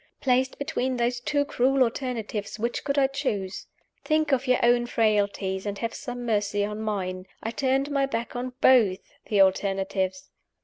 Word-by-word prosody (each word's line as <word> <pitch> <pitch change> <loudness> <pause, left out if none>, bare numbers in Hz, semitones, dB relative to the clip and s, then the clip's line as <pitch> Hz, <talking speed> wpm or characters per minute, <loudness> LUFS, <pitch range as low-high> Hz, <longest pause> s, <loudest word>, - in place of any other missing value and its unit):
Placed 260 0 +1
between 260 -3 -2
those 240 0 0
two 285 +3 0
cruel 265 0 +2
alternatives, 230 -4 -3
which 235 +2 -2
could 280 0 -1
I 275 - +5
choose? 215 -9 -3 0.4
Think 310 -1 +1
of 270 0 +1
your 255 - +4
own 240 0 +4
frailties, 200 -4 0
and 200 0 -3
have 230 +2 -3
some 245 -1 -6
mercy 205 -2 0
on 210 +1 -5
mine. 185 -3 -3 0.2
I 225 - -2
turned 270 +3 0
my 275 -1 +1
back 235 -2 -4
on 250 +1 -4
both 220 -8 +4
the 205 -2 +3
alternatives. 195 +5 0
240 Hz, 165 wpm, -26 LUFS, 205-265 Hz, 0.4 s, I